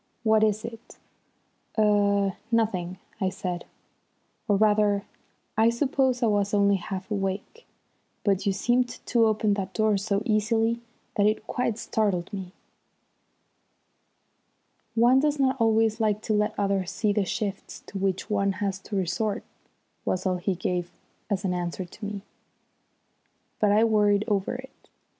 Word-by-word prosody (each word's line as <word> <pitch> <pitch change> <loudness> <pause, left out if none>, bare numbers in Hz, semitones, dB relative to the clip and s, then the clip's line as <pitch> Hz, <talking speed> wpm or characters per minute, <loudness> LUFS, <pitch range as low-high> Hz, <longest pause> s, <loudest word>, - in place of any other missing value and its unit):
"What 220 -1 +4
is 215 0 +1
it?" 230 0 -10 0.8
"Er 200 -2 +3 0.2
nothing," 190 -6 0 0.2
I 190 -3 +1
said. 180 -2 -4 0.8
"Or 205 - +3
rather 205 -1 +3 0.5
I 225 +1 +5
suppose 260 0 +1
I - - +5
was 205 -2 +1
only 200 -1 +4
half 190 +2 -6
awake; 200 - -3 0.6
but 200 -1 +1
you - - +4
seemed 245 +5 +1
to 235 -1 +1
open 215 -1 +2
that 195 -2 -4
door 215 -2 +3
so 200 +1 -1
easily 225 +2 +1 0.4
that 205 0 +4
it 215 0 0
quite 235 -3 -1
startled 205 -5 -1
me." 190 -3 -5 2.4
"One 240 +3 +5
does 300 +1 +1
not 265 -2 +1
always 225 0 +3
like 215 -1 +1
to 220 - 0
let 210 +1 +1
others 195 -2 0
see 210 -2 0
the 205 -1 +2
shifts 200 0 -4
to 195 - -6
which 190 -1 -1
one 200 -2 +1
has 195 -1 -2
to 205 - -7
resort," 200 +3 -1 0.6
was 185 - -1
all 185 - +2
the - - -1
answer 195 +3 0 1.3
he 175 - -13
gave - - -16
me. 205 -1 -5 1.4
But 210 -1 +3
I 215 +2 +5
worried 210 -2 +3
over 200 0 0
it. 265 +1 -12
210 Hz, 140 wpm, -26 LUFS, 195-225 Hz, 2.4 s, I